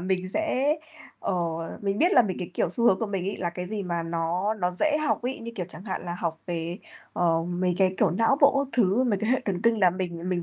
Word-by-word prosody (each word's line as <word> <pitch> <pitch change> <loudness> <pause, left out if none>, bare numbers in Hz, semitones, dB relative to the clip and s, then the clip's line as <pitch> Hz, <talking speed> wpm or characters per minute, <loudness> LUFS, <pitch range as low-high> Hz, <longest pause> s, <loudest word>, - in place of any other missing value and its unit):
mình 185 0 -1
sẽ, 300 - +1 0.4
ờ 190 - -1 0.5
mình 200 0 -1
biết 350 +4 +4
là 250 - +7
mình 195 -5 -2
cái, 180 - -5
kiểu, - - +1
xu 235 +5 -1
hướng 190 -5 +5
của 225 - -1
mình 195 -3 -3
ấy 200 - -2
là 175 -2 -2
cái 180 +1 -5
gì 205 +1 -3
mà 170 -2 -2
nó 170 +5 -1
nó 180 -4 -1
dễ 300 +12 +1
học - - 0
ấy, 255 +2 -3
như 230 0 -7
kiểu, 180 -5 -4
chẳng 185 - -10
hạn 190 -5 -4
là 175 - -3
học 165 -1 -3
về, 170 +1 -3 0.3
ờ, 165 -2 +2
mấy 180 0 0
cái, 190 -1 +3
kiểu, 200 -6 +4
não 225 +9 +2
bộ 280 0 +5
các 265 - -12
thứ, 225 +3 +3
mấy 210 -5 +1
cái 220 +3 -1
hệ 260 - +3
thần 195 -1 -2
kinh 230 -1 +3
là 180 -2 +6
mình 175 -1 -4
mình 175 -2 0
185 Hz, 265 wpm, -26 LUFS, 175-230 Hz, 0.5 s, là